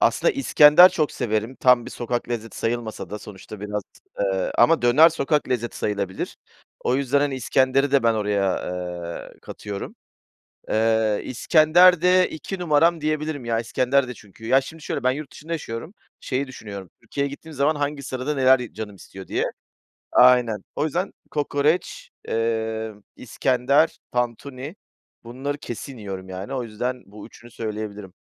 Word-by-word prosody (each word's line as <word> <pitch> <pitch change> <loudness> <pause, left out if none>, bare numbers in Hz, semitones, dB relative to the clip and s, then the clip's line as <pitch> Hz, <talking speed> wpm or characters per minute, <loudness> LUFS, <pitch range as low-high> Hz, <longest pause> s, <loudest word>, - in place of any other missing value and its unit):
aslında - - +3
iskender 175 - +7
çok 155 -5 -1
severim, 110 +3 -2
tam 125 -2 +4
bir - - -7
sokak 120 0 -3
lezzeti 115 -2 -5
sayılmasa 115 -1 -3
da, 105 - -5
sonuçta 105 0 -11
biraz, 105 0 -3 0.4
eee, 95 -2 0
ama 165 -4 +5
döner 130 +7 +7
sokak 150 -2 0
lezzeti 120 -2 -2
sayılabilir. 100 -3 -3 0.4
O 125 - +1
yüzden, 140 0 +1
hani, 145 -2 0
iskenderi 130 +2 +2
de 140 - +4
ben 115 -1 +3
oraya, 100 -3 0 0.7
eee, - - -24
katıyorum. 100 -1 -7 0.8
Eee, 110 -1 +2
iskender 160 +6 +5
de 180 +1 +4
2 185 +4 -6
numaram 165 0 +3
diyebilirim, 155 -3 -2
ya, 115 -1 0
iskender 130 +3 +1
de 125 - -5
çünkü 105 0 -15
Ya, 135 +4 +4
şimdi, 160 +3 -11
şöyle, - - -3
ben 130 - +3
yurt 145 +1 -6
dışında 165 +3 -7
yaşıyorum, 150 - -6 0.3
şeyi 135 +1 -2
düşünüyorum, 100 -7 -9
Türkiye'ye 140 0 -3
gittiğim 155 +3 -10
zaman 145 +3 +1
hangi 145 -1 -2
sırada 130 +3 -3
neler 130 -1 +5
y 125 - -7
canım 105 -2 -7
istiyor 95 0 -12
diye. - - -1 0.7
Aynen, 120 -5 +5
o 150 - 0
yüzden 175 +5 -2 0.2
kokoreç, 150 +2 -1 0.2
eee, 110 -1 -1 0.2
iskender, 130 +5 +1
tantuni, 130 - -3 0.5
bunları 135 +5 -4
kesin 130 -1 -7
yiyorum 95 -2 -7
yani, 95 +8 -6
o 130 - -2
yüzden 120 +3 -4
bu 105 +1 -11
üçünü 120 +1 -16
söyleyebilirim. 105 -4 -6
125 Hz, 155 wpm, -23 LUFS, 110-145 Hz, 0.8 s, iskender